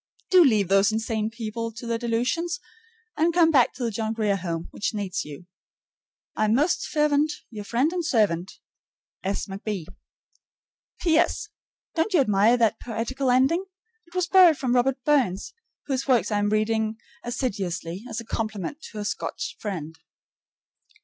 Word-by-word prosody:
Do 365 -2 +8
leave 215 - +3
those 195 +2 +4
insane 220 -1 -1
people 230 0 -4
to 230 +2 -9
their 230 -1 -1
delusions, 250 +10 -1 0.6
and 325 +3 +2
come 335 -1 +4
back 260 -6 +5
to 250 - -5
the 230 - 0
John 220 +1 -2
Grier 215 -3 +1
Home, 170 -3 -4
which 215 - -3
needs 200 -2 -2
you. 150 +4 -10 0.9
I 215 - +1
am 215 +1 +3
most 300 +7 +1
fervent' 300 0 +2 0.2
Your 210 -2 -7
friend 250 - +1
and 355 -1 -1
servant, 200 - +1 0.7
S. 195 +2 -2
McB. 195 -2 -5 1.2
P.S. 340 +5 +2 0.4
Don't 365 +4 0
you - - +6
admire 215 -1 +4
that 225 -3 +2
poetical 245 +3 -2
ending? 265 +9 +3 0.4
It 340 - -19
was 365 -1 +2
borrowed 360 -5 +6
from 255 -3 0
Robert 255 +1 +1
Burns, 255 -11 +1 0.3
whose 270 -1 -2
works 245 -4 +3
I 205 - +2
am 205 0 +1
reading 220 +1 0 0.3
assiduously 195 -7 -3
as 230 - -4
a 230 - -8
compliment 220 - -4
to 215 - -10
a 205 - -3
Scotch 205 - -4
friend. 160 -6 -5
230 Hz, 155 wpm, -25 LUFS, 205-275 Hz, 1.2 s, Do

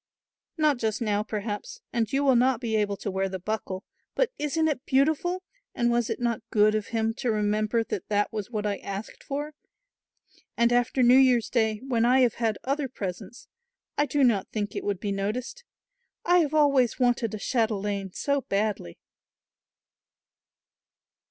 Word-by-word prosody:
"Not 300 -4 +2
just 220 -2 -1
now 210 -3 0
perhaps, 215 - -5
and 230 -2 0
you 275 +1 +1
will 270 -2 +4
not 250 0 +3
be 230 -3 -2
able 205 -2 0
to 200 - -4
wear 190 0 -1
the 190 - -4
buckle, 190 0 -4 0.3
but - - +1
isn't 315 +2 +1
it 280 -4 -2
beautiful 315 +7 +1 0.3
and 240 0 +2
was 235 -1 +1
it - - -2
not 235 -2 -1
good 215 0 +4
of 215 -1 -1
him 225 -1 0
to 255 - -1
remember 215 +1 +1
that 205 - -5
that 205 0 +1
was 210 -1 -4
what 215 -3 -3
I 205 -1 0
asked 200 +2 -7
for; 290 +2 -4 1.0
and 235 +1 +3
after 245 +1 +2
New 250 +2 +7
Year's 250 -4 +3
Day, 220 -3 +1
when 235 -3 +1
I 255 +2 +5
have 245 -3 +3
had 220 -2 +1
other 275 +1 -1
presents, 195 0 -7 0.5
I 290 - +1
do 280 +1 +1
not 220 -7 +3
think 205 -2 -3
it - - -3
would 200 -3 -2
be 205 0 -3
noticed. 230 - -3 0.6
I 355 +1 +5
have 310 -2 +1
always 275 -6 +3
wanted 240 -3 +1
a - - -4
chatelaine 205 -4 -1
so 280 +7 0
badly." 200 - -2
230 Hz, 170 wpm, -26 LUFS, 210-265 Hz, 1.0 s, New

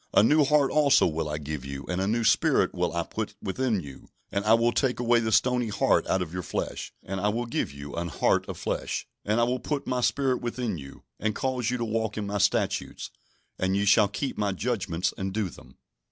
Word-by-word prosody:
A - - +7
new 150 +6 +5
heart 145 -1 +3
also 150 -2 +5
will 80 -1 -1
I 75 - -2
give 75 -2 -5
you, 70 0 -6
and 90 +1 -1
a 95 - 0
new 115 +2 +1
spirit 110 - +3
will - - 0
I - - -1
put - - -5
within 110 0 -1
you: 70 -4 -12 0.2
and 100 0 -1
I 110 +1 +6
will 115 +1 +2
take 125 -1 0
away 120 -1 +4
the 110 -1 -1
stony 125 +2 +3
heart 100 -2 +2
out 95 - +1
of 85 -1 -9
your 90 - -2
flesh, 80 - -4
and 95 0 -4
I 105 - +2
will 120 +3 -1
give 115 - -2
you 70 0 -9
an 85 0 -2
heart 80 - +1
of - - -5
flesh. - - -3 0.2
And 105 +3 +1
I - - +4
will 125 +2 0
put 140 +3 -3
My 125 -1 -1
Spirit 130 0 +1
within 120 -6 -3
you, 70 -1 -11 0.2
and 110 0 -1
cause 130 -3 -1
you 125 - 0
to 120 - -2
walk 110 -1 -2
in 105 - -2
My 100 0 -2
statutes, 100 +1 0 0.5
and 95 +1 +1
ye 100 - +1
shall 105 +1 +5
keep 105 +7 -4
My 100 -2 +1
judgments, 95 -5 -1
and 95 0 -2
do 105 -1 -1
them." 65 +1 -16
105 Hz, 235 wpm, -27 LUFS, 95-120 Hz, 0.5 s, A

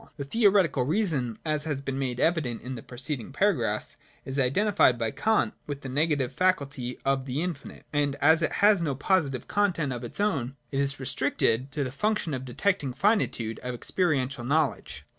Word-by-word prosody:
The 140 - -4
theoretical 195 - +3
reason, 150 - 0
as 155 -1 0
has 150 -4 -1
been 135 -1 -4
made 125 -2 -2
evident 155 -9 0
in 130 - -5
the 120 - -6
preceding 130 0 -5
paragraphs, - - 0 0.3
is 135 +1 -2
identified 135 - +3
by 115 -1 -1
Kant 220 -1 +1
with 145 -1 -5
the 135 - -6
negative 140 -2 0
faculty 140 -8 0
of 135 -1 +1
the 135 +5 -1
infinite; 165 -6 -6
and 145 -1 +1
as 160 +3 +4
it 160 - +1
has 205 -3 +5
no 145 -5 -1
positive 145 -4 0
content 175 -9 +1
of 120 0 -6
its 120 - -5
own, 140 - 0 0.2
it 135 - -1
is 140 -1 0
restricted 130 -1 0
to 150 - -1
the 130 - -4
function 210 +1 -1
of 130 -1 -4
detecting 150 +4 0
the 125 - -7
finitude 195 - +1
of 125 0 -5
experiential 135 -4 0
knowledge. 145 +3 -1
140 Hz, 180 wpm, -27 LUFS, 130-170 Hz, 0.3 s, has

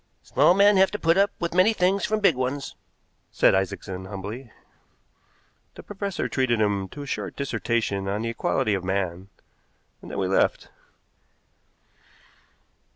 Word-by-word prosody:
"Small 150 +7 +3
men 200 0 +5
have 190 0 +5
to 210 - -4
put 165 -3 +2
up 200 +1 +4
with 170 -1 -2
many 185 +5 +4
things 195 0 +1
from 215 0 -1
big 185 -7 +4
ones," 130 +2 -3 0.5
said - - +3
Isaacson 95 0 -2
humbly. 105 +6 -7 1.2
The - - -11
professor 200 -1 -4
treated 130 -4 0
him 100 -2 0
to 145 - -8
a - - -8
short - - -4
dissertation 115 -7 -2
on 100 +3 -2
the 115 - -2
equality 110 -2 0
of 95 -2 -2
man, 95 -1 -3 0.7
and - - -11
then - - -6
we 95 -2 0
left. 95 - +1
125 Hz, 150 wpm, -25 LUFS, -, 1.2 s, men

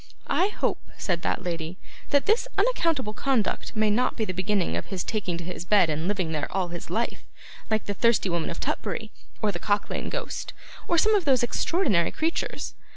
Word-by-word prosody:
'I 375 - +3
hope,' 420 - -2
said 175 -3 -1
that 185 - -1
lady, 170 -1 -3 0.3
'that 285 -1 +3
this 435 +3 +3
unaccountable 330 - +2
conduct 250 -4 0
may 215 -1 +3
not 250 +4 +1
be 220 - +1
the 185 - -3
beginning 185 - 0
of 85 - -3
his 185 -3 -3
taking 190 -6 -2
to 175 - -6
his 175 0 -5
bed 185 -3 +4
and 155 +3 -1
living 190 -5 0
there 150 -2 -2
all 185 -2 0
his 170 0 -7
life, - - -1 0.5
like 220 -1 +1
the 205 - -1
Thirsty 230 -1 +3
Woman 170 -3 0
of 170 - -5
Tutbury, 220 -1 -2 0.3
or 210 - +3
the 175 - -5
Cock 205 +2 +1
lane - - -2
Ghost, - - -4 0.3
or 340 - +2
some 435 +6 +5
of 405 -4 +3
those 260 -4 +4
extraordinary 240 - +2
creatures. 325 +1 -2
205 Hz, 200 wpm, -26 LUFS, 175-260 Hz, 0.5 s, some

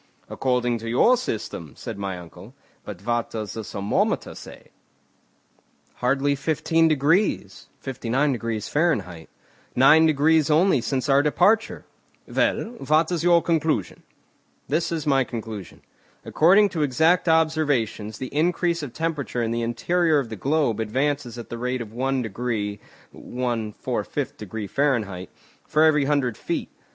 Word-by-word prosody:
"According 125 -2 0
to 115 +1 -6
your 180 - +4
system," 105 - -5
said - - -7
my 95 -2 -3
uncle. 90 +7 -13 0.3
"But 100 -1 -9
what 120 -1 0
does 110 -4 -5
the 110 - -5
thermometer 100 0 -1
say?" - - -12 1.3
"Hardly 135 +3 +1
fifteen 160 +3 +1
degrees 150 - +1 0.2
(59° 120 -3 -1
Fahr), 105 - -1 0.5
nine 150 +5 +6
degrees 155 0 +3
only 155 -2 +4
since 130 +1 -2
our 140 0 +5
departure." 205 +9 +2 0.4
"Well, 235 +2 -1
what 155 +4 +2
is 170 -2 -1
your 170 -1 +4
conclusion?" 160 - -1 0.7
"This 160 +4 0
is 160 -2 -3
my 135 -2 +3
conclusion. 110 -5 -8 0.4
According 195 +6 +4
to 165 -4 -3
exact 160 +6 +2
observations, 145 -10 +1
the 130 +2 -7
increase 170 +1 +1
of 140 -5 -7
temperature 150 -6 -2
in 115 - -1
the 115 0 -1
interior 155 +8 +1
of 135 -5 -1
the 110 - -5
globe 135 -2 0
advances 130 +2 -1
at 120 - -8
the 120 - -6
rate 125 +1 -2
of 110 -2 -7
one 130 +1 -1
degree 105 -2 -3 0.3
(1 120 -4 -4
4/5° 105 +1 -4
Fahr.) 110 -11 0 0.4
for 155 - +3
every 150 -3 +4
hundred 135 -6 0
feet. - - -3
135 Hz, 135 wpm, -24 LUFS, 115-155 Hz, 1.3 s, nine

